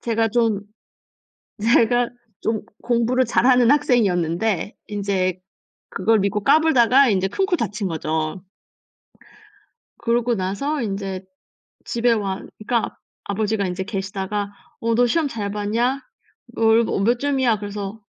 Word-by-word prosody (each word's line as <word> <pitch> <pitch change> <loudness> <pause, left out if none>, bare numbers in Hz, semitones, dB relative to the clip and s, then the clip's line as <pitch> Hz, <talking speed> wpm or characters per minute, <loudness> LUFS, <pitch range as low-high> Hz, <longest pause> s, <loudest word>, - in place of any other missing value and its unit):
...제가 225 -1 0
좀 225 -3 +1 1.0
제가 235 +2 +3 0.3
좀 220 -1 -1 0.2
공부를 245 +2 +1
잘하는 245 0 +4
학생이었는데 200 - +1
인제 195 -3 -1 0.5
그걸 215 +3 +2
믿고 200 +1 -1
까불다가 275 -4 +5
인제 190 -2 +1
큰코 385 - 0
다친 210 - -2
거죠. 160 +1 -2 1.6
그러고 235 0 +1
나서 225 +11 -2
인제 195 -3 -4 0.6
집에 235 0 +1
와 200 -3 -1 0.2
그니까 230 +2 -1 0.3
아버지가 205 0 -1
인제 185 +1 -3
계시다가 200 0 -3 0.3
"어 230 0 0
너 245 +1 +4
시험 315 +4 +1
잘 210 -6 -4
봤냐? 225 +6 0 0.6
얼 225 +1 +4
뭐 200 - -1
몇 235 +4 +2
점이야?" 265 -6 +1
그래서 205 +1 -6
220 Hz, 250 characters per minute, -22 LUFS, 195-240 Hz, 1.6 s, 까불다가